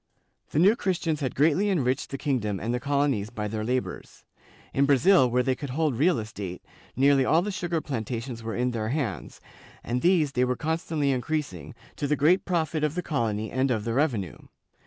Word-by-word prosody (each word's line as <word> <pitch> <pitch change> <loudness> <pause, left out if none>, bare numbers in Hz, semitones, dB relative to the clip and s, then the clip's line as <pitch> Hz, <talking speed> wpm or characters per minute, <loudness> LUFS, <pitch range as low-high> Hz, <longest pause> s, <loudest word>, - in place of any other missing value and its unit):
The - - -4
New 195 +7 +6
Christians 170 -7 -1
had 130 -3 -3
greatly 160 +8 +3
enriched 135 -9 0
the 135 - -4
kingdom 115 -9 -1
and 115 +6 -2
the 125 - 0
colonies 140 -6 0
by 105 -2 -4
their 110 +1 -3
labors. 125 +3 -4 0.5
In 140 +1 +2
Brazil, 145 0 +5
where 125 +1 +2
they 130 - +1
could 140 +2 -6
hold 150 0 0
real 160 +7 +3
estate, 100 -5 -6 0.3
nearly 135 +1 +4
all 160 +6 +3
the 210 - -3
sugar 175 -3 -2
plantations 115 -2 -4
were 115 0 -4
in 125 +1 0
their 110 -2 -3
hands, 125 - -3 0.4
and 125 +1 -2
these 170 -5 +3
they 125 -2 +1
were 125 0 +1
constantly 160 -1 -1
increasing, 130 - -3 0.2
to 145 - -1
the 150 - +2
great 160 +6 +3
profit 160 -3 -1
of 150 +1 0
the 180 - -2
colony 110 -7 -2
and 130 +1 +1
of 110 -4 0
the 115 +1 -2
revenue. 120 - 0
135 Hz, 195 wpm, -26 LUFS, 115-155 Hz, 0.5 s, New